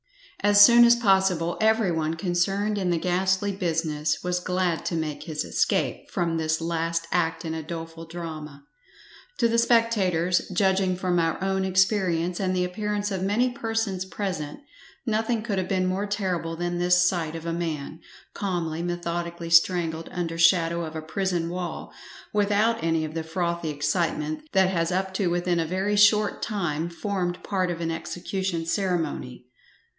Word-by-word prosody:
As 205 0 +5
soon 235 +3 +9
as 235 0 +7
possible 190 -6 +2
every 220 -3 +3
one 160 -1 -1
concerned 195 +4 0
in 185 -2 0
the 175 - +2
ghastly 185 +3 +1
business 160 -5 -1
was 180 0 0
glad 180 -3 -1
to 170 - -1
make 155 -2 -3
his 155 -1 -4
escape - - 0
from 170 -1 -1
this 160 0 0
last 165 0 -1
act 165 -1 0
in 160 - -3
a 160 - -3
doleful 165 +1 -7
drama. 155 -4 -7 0.7
To 235 - +3
the 230 0 +2
spectators, 200 -7 +2
judging 190 0 +2
from 180 -1 0
our 165 -1 +1
own 190 0 0
experience, 185 -2 +1
and 185 -2 0
the 180 0 +1
appearance 205 +2 -2
of 190 -2 -2
many 220 +6 +1
persons 225 -6 -2
present, 185 - -4 0.4
nothing 225 0 0
could 205 -4 -1
have 185 - -2
been 185 -1 0
more 190 +3 -1
terrible 185 -5 -2
than 175 +1 -2
this 180 0 +4
sight 165 -3 -1
of 165 0 -7
a 165 - -2
man, 160 -2 -4 0.3
calmly, 170 -5 -2
methodically 170 -1 -4
strangled 165 -1 +3
under 165 -2 -3
shadow 170 0 +4
of 160 0 -7
a 160 - -5
prison 175 0 -1
wall, 175 -2 -5 0.4
without 210 +2 +2
any 165 -1 +1
of 155 - -7
the 165 - -2
frothy 170 0 -2
excitement 150 +1 -1
that 190 -1 +4
has 165 -2 0
up 190 +1 -1
to 190 -1 0
within 175 0 0
a 165 - 0
very 190 +4 0
short 205 0 +4
time 170 -6 -2
formed 175 +1 -3
part 185 -3 -1
of 170 -1 -3
an 165 -1 -2
execution 175 +1 -3
ceremony. 165 - -2
175 Hz, 165 wpm, -25 LUFS, 165-195 Hz, 0.7 s, soon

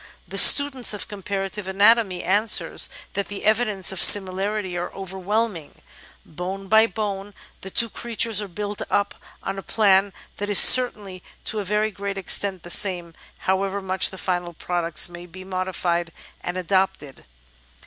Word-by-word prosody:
The - - -3
student 270 -6 +5
of 205 - -7
comparative 195 0 -6
anatomy 200 -1 +2
answers 210 +4 +2 0.2
that 200 - -4
the 200 -1 -8
evidences 215 -4 +1
of 190 - -2
similarity 195 0 +4
are 175 0 -5
overwhelming: 190 -2 -4 0.5
bone 190 +4 -7
by 220 +2 +4
bone 200 -1 -6 0.3
the 190 - -6
two 230 +4 +1
creatures 230 -1 -2
are 205 - -6
built 205 +3 -7
up 200 - -1 0.3
on 195 - -5
a - - -7
plan 200 -2 +2 0.3
that 205 0 -5
is 205 - +1
certainly 205 -7 +5 0.2
to 215 - -2
a 205 - -5
very 210 +2 -1
great 200 0 -6
extent 195 -1 -1
the 175 - -5
same, 175 -4 +2 0.3
however 195 +1 -1
much 190 -1 0
the 190 - -11
final 175 -2 -4
products 170 -1 -1
may 175 0 -12
be 185 +2 -12
modified 185 -2 -3 0.3
and 175 +1 -5
adapted. 185 -6 -2
195 Hz, 150 wpm, -22 LUFS, 185-210 Hz, 0.5 s, student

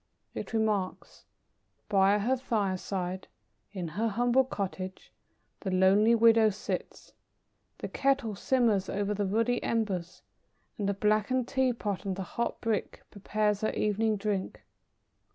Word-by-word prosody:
It - - -6
remarks: 215 -4 -2 0.6
"By 195 +1 +4
her 235 +6 +1
fireside, 190 -5 -2 0.4
in 180 -5 -4
her 210 +8 -1
humble 240 +4 +3
cottage, 190 -5 -5 0.5
the 195 - -4
lonely 195 +5 +4
widow 225 -1 +6
sits; 210 0 -5 0.6
the - - -5
kettle 270 -5 0
simmers 215 -3 +1
over 205 +1 -1
the 205 -1 -1
ruddy 230 +5 +1
embers, 195 -6 -2 0.6
and 200 -1 0
the 200 - 0
blackened 215 +5 +1
tea 265 -1 +2
pot 205 -5 -3
on 195 -2 -2
the 195 - -4
hot 235 +6 -3
brick 225 -4 -2
prepares 210 0 -1
her 215 - 0
evening 215 +1 +1
drink. 200 -2 -3
210 Hz, 130 wpm, -29 LUFS, 195-230 Hz, 0.6 s, widow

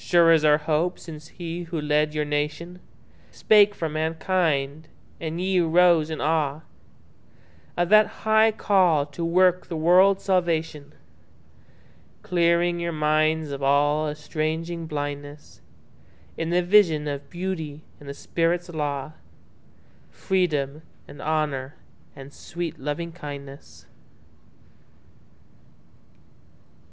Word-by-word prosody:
Sure 170 -1 +4
is 160 -2 +4
our 150 -1 +5
hope 155 +3 -1
since 155 -2 -11
he 170 0 -7
who 165 -1 -4
led 150 0 0
your 150 0 0
nationSpake 175 +7 0
for 165 - -3
mankind, 155 -2 -1 0.3
and 165 +1 -4
ye 185 0 +1
arose 170 -1 +3
in 160 - -4
aweOf 155 -1 -1 1.1
that 210 +5 +4 0.2
high 220 0 +4
call 185 -8 +2
to 145 +3 -7
work 180 +2 +2
the 170 - -5
world's 185 +4 +4
salvation; 165 -5 -1 1.3
Clearing 175 0 +1
your 170 0 -2
minds 155 0 +1
of 140 0 -5
all 145 +2 +2
estranging 160 +2 -4
blindnessIn 145 0 -6 0.8
the 170 +2 0
vision 175 -6 +3
of 140 -1 -5
Beauty 165 -5 -5 0.2
and 145 - -11
the 140 - -6
Spirit's 175 +3 -1
law, 145 -3 -3 1.0
Freedom 155 -6 -1 0.3
and 145 - -12
Honour 150 -3 -2 0.4
and 135 +1 -12
sweet 170 -2 -6
Lovingkindness. 145 -2 -7
160 Hz, 105 wpm, -24 LUFS, 150-175 Hz, 1.3 s, our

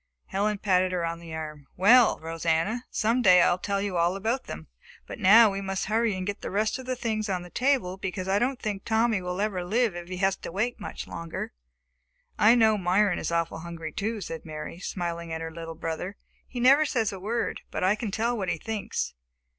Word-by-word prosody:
Helen 205 +2 0
patted 185 -2 +2
her 175 -2 0
on 165 0 -3
the 170 -1 -10
arm. 150 -3 -7
"Well, 230 +6 +6
Rosanna, 165 +8 -1
some 230 +4 +1
day 185 -5 +7
I - - +4
will 175 - 0
tell 200 +1 -1
you 195 -3 -2
all 170 +2 +2
about 225 +6 -1
them, 80 0 -7 0.4
but - - -8
now 215 +3 +7
we 195 0 -3
must 195 -1 -2
hurry 220 0 +1
and 185 0 -4
get 205 +1 -4
the - - -4
rest 210 +5 0
of 255 - -9
the 255 - -1
things 220 -3 -2
on 180 -2 -1
the 175 - -12
table 250 -9 +1
because 190 -1 -4
I 195 +1 +2
don't 255 +2 0
think 205 -2 -3
Tommy 225 -2 +2
will 180 +1 -4
ever 200 -3 -1
live 220 +2 +1
if 175 0 -7
he 185 - -4
has 195 0 +2
to - - -8
wait 225 +7 -1
much 205 - -6
longer." 165 - -6 0.9
"I 220 +3 +7
know 220 -3 +4
Myron 185 +1 +2
is - - -3
awfully 165 -1 -1
hungry 165 -2 -6
too," 215 +4 -3
said 165 -3 -6
Mary, 155 +2 -7
smiling 170 -3 -4
at 160 0 -3
her 165 0 -5
little 165 0 -7
brother. 165 +4 -4 0.3
"He 250 - -6
never 270 +5 +6
says 230 -8 0
a 190 - -7
word, 225 +5 -2
but - - -3
I 190 +2 +4
can 215 0 -4
tell 230 +4 0
what 195 -5 -2
he 170 - 0
thinks. 215 - -3
195 Hz, 225 wpm, -27 LUFS, 170-220 Hz, 0.9 s, day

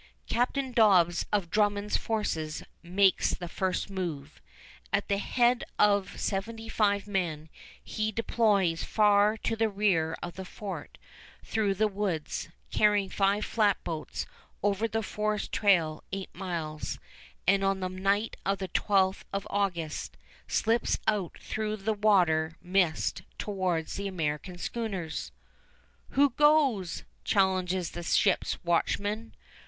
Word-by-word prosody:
Captain 255 +3 0
Dobbs 185 -7 +4
of 195 -5 0
Drummond's 205 -1 +1
forces 160 -9 -2 0.2
makes 185 +2 +3
the 175 - -6
first 185 +2 -1
move. 160 -7 -5 0.5
At - - 0
the 200 0 +1
head 245 +3 +2
of 200 -2 +2
seventy 225 +3 -3
five 205 -3 +1
men, 170 -6 -2 0.3
he 215 0 -2
deploys 205 -6 +2
far 210 0 +4
to 225 - -1
the 225 0 +1
rear 190 -6 +1
of 175 0 -6
the 190 - -4
fort 195 +1 -7 0.5
through 210 -3 0
the 215 +3 +3
woods, 195 -7 -3 0.2
carrying 205 -2 +3
five 200 +1 +2
flatboats 190 -8 -1 0.4
over 205 +2 +1
the 225 0 -2
forest 210 0 -2
trail 170 -7 +2
eight 195 0 -5
miles, 165 -5 -4 0.5
and 195 +1 +4
on 195 0 +1
the 185 - -1
night 195 +4 0
of 195 0 0
the 190 -1 -5
12th 190 +1 +2
of 200 0 -3
August 175 -6 -2 0.3
slips 230 +1 +1
out 200 -5 0
through 215 -1 -3
the 215 +2 -1
water 175 -7 +3
mist 180 -3 +1 0.2
towards 185 -6 -2
the 200 0 -3
American 175 0 -3
schooners. 195 -5 -4 0.9
"Who 285 0 +5
goes?" 275 - +3 0.2
challenges 185 -3 +1
the 175 - -6
ships' 170 - +2
watchman. 205 +6 0
195 Hz, 125 wpm, -29 LUFS, 180-210 Hz, 0.9 s, Who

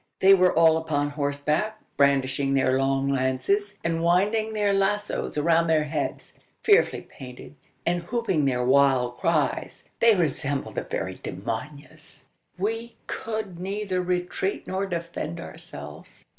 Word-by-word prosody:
They 195 +1 +7
were 185 -1 +5
all 160 0 +5
upon 145 -3 -1
horseback, 150 +9 -1 0.2
brandishing 135 0 +2
their 130 -1 +3
long 135 0 +1
lances, 140 +11 0
and 165 0 0
winding 205 +6 +2
their 205 -2 +1
lazos 200 -3 -1
around 165 +2 +3
their 160 -1 +3
heads. 150 -1 -4 0.2
Fearfully 425 +1 +4
painted, 125 0 -11 0.3
and 175 +1 +1
whooping 190 - 0
their 125 -2 +1
wild 130 -2 +3
cries, 160 -4 -1
they 230 -2 +6
resembled 145 -5 -1
the - - -2
very - - -4
demonios! 150 +6 -7 0.3
We 225 +5 -3
could 215 -6 -4
neither 195 0 -2
retreat 180 +2 -2
nor 190 +1 -2
defend 170 -2 -4
ourselves. - - -10
165 Hz, 130 wpm, -25 LUFS, 140-195 Hz, 0.3 s, They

